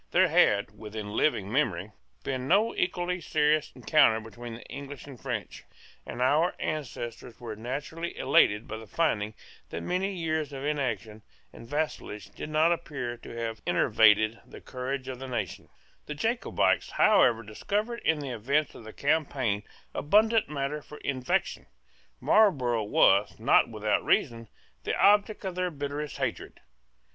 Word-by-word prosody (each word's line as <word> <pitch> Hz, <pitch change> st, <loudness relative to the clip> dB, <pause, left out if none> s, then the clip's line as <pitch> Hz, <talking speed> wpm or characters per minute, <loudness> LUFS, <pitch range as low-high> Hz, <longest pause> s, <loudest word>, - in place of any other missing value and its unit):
There -, -, +4 dB
had 105 Hz, +1 st, +3 dB
within 105 Hz, -1 st, -7 dB
living 105 Hz, -4 st, +1 dB
memory 105 Hz, -, 0 dB, 0.3 s
been 130 Hz, -1 st, -3 dB
no 205 Hz, +7 st, +3 dB
equally 180 Hz, 0 st, -1 dB
serious 150 Hz, -1 st, +1 dB
encounter 125 Hz, -2 st, +4 dB
between 115 Hz, +1 st, -9 dB
the 115 Hz, -, -11 dB
English 140 Hz, 0 st, -8 dB
and 135 Hz, -5 st, -12 dB
French; 115 Hz, -8 st, -5 dB, 0.4 s
and 125 Hz, -, -2 dB
our 155 Hz, +7 st, +3 dB
ancestors 120 Hz, -5 st, -5 dB
were 115 Hz, -3 st, -6 dB
naturally 145 Hz, +9 st, -5 dB
elated 115 Hz, -5 st, +3 dB
by 110 Hz, 0 st, -6 dB
finding 110 Hz, -8 st, 0 dB, 0.3 s
that -, -, -5 dB
many 185 Hz, +2 st, -1 dB
years 160 Hz, -4 st, -2 dB
of 135 Hz, +1 st, -5 dB
inaction 125 Hz, -7 st, -2 dB, 0.3 s
and 115 Hz, -, -12 dB
vassalage 145 Hz, -8 st, -4 dB
did -, -, -7 dB
not 155 Hz, +2 st, +3 dB
appear 140 Hz, -8 st, -3 dB
to -, -, -12 dB
have 115 Hz, -1 st, -4 dB
enervated 110 Hz, -1 st, +4 dB
the -, -, -12 dB
courage 130 Hz, +1 st, -5 dB
of 130 Hz, -1 st, -6 dB
the 135 Hz, -, -6 dB
nation, 110 Hz, -8 st, -4 dB, 0.4 s
The 150 Hz, -, -5 dB
Jacobites 225 Hz, +10 st, +1 dB
however 125 Hz, -, +4 dB
discovered 210 Hz, -, -3 dB
in 160 Hz, -2 st, +1 dB
the 135 Hz, -2 st, -5 dB
events 135 Hz, +6 st, 0 dB
of 115 Hz, -, -12 dB
the 110 Hz, -, -9 dB
campaign 140 Hz, -8 st, 0 dB, 0.3 s
abundant 215 Hz, +7 st, +3 dB
matter 150 Hz, 0 st, -3 dB
for 150 Hz, -, -12 dB
invective. 135 Hz, +8 st, -1 dB, 0.5 s
Marlborough 130 Hz, -, +3 dB
was, 100 Hz, 0 st, +3 dB
not -, -, +4 dB
without -, -, 0 dB
reason, 115 Hz, -1 st, +1 dB, 0.4 s
the -, -, -1 dB
object 210 Hz, 0 st, +4 dB
of 190 Hz, -, -2 dB
their 180 Hz, 0 st, -1 dB
bitterest 145 Hz, -1 st, -5 dB
hatred. -, -, -4 dB
135 Hz, 145 wpm, -28 LUFS, 115-155 Hz, 0.5 s, There